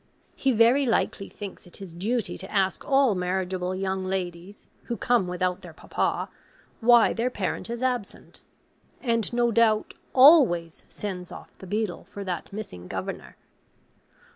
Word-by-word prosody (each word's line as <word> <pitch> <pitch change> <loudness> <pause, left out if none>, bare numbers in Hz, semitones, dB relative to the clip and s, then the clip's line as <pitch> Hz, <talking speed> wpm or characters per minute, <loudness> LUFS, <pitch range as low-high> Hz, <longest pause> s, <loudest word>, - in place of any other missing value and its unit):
He 270 - +1
very 240 +4 +4
likely 210 -3 0
thinks 200 -3 -9
it 175 - -11
his 190 -4 -10
duty 215 +7 -2
to 190 - -7
ask 195 -2 0
all 270 -4 +3
marriageable 185 0 -2
young 190 0 -2
ladies, 185 +1 -5 0.2
who 235 - -3
come 240 -6 +2
without 180 +1 -1
their 175 -3 -11
papa, - - -2 0.5
why 240 -1 +5
their 235 +2 0
parent 205 -1 -3
is 235 +1 -4
absent; 250 -5 -3 0.6
and, 230 -4 0
no 240 -1 +2
doubt, 220 -1 +2 0.2
ALWAYS 255 - +6
sends 185 -4 -6
off - - -11
the 190 - -10
beadle 205 -3 -2
for 200 +1 -8
that 185 0 -5
missing 195 - -7
governor. - - -6
200 Hz, 145 wpm, -26 LUFS, 185-235 Hz, 0.6 s, ALWAYS